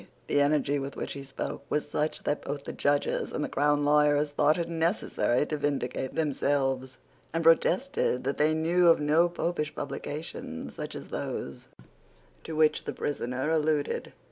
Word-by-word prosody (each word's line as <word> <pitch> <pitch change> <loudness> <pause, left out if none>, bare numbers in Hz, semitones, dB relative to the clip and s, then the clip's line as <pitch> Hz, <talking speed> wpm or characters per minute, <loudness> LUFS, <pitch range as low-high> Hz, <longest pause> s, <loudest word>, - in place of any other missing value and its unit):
The 145 - +2
energy 145 0 +2
with 135 0 -5
which - - -4
he 140 - -6
spoke 135 0 -5
was 150 0 0
such 150 +1 -2
that 145 - -1
both 145 0 -4
the - - -6
Judges 145 0 0
and - - -2
the - - -1
crown 145 +1 +2
lawyers 150 0 +3
thought 150 +2 +3
it 170 -1 -1
necessary 165 - +1
to 150 - -3
vindicate 140 -3 -2
themselves, 135 -3 0 0.3
and 165 +1 -1
protested 170 - +3
that 140 +2 -2
they 155 +1 +3
knew 170 +3 +3
of 165 - +6
no 155 +4 +3
Popish 170 -3 -2
publications 145 - -5
such - - -6
as - - -8
those 70 - -5 0.8
to 160 - -6
which 155 -1 +3
the - - -3
prisoner 130 +1 -2
alluded. 155 -2 0
150 Hz, 165 wpm, -28 LUFS, 140-160 Hz, 0.8 s, of